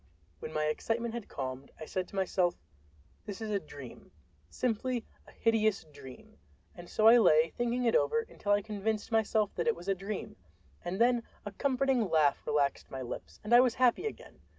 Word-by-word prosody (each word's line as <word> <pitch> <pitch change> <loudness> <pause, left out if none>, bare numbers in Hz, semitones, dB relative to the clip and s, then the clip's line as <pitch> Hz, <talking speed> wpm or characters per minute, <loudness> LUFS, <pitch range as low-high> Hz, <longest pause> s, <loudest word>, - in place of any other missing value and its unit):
When - - -7
my 155 -1 -1
excitement 225 +9 -1
had 235 -3 -5
calmed, 130 0 -5
I 155 - -6
said 185 +3 -3
to - - -13
myself, 185 -2 +1 0.7
"This 200 -2 -6
is 220 -1 -4
a 200 - +1
dream—simply 145 - -5 0.2
a - - -14
hideous 220 -2 +1
dream." 160 +8 -14 0.3
And 175 -3 -12
so 215 - +3
I 235 +2 +9
lay 160 -6 +5
thinking 240 +1 -1
it 230 - +3
over 230 +11 +2
until 205 - -4
I 205 0 +2
convinced 215 +1 -3
myself 220 -2 +1
that - - -2
it 230 - +3
was 175 +2 -11
a 195 - +3
dream, 195 +2 -6 0.5
and 185 +3 -4
then 240 0 +4 0.2
a 205 - -5
comforting 260 -1 +1
laugh 150 -3 +3
relaxed 145 -2 0
my 130 -1 -5
lips 120 - -8
and 210 +3 -1
I 240 - +10
was 250 -2 +4
happy 255 - +3
again. - - -9
205 Hz, 185 wpm, -31 LUFS, 155-230 Hz, 0.7 s, I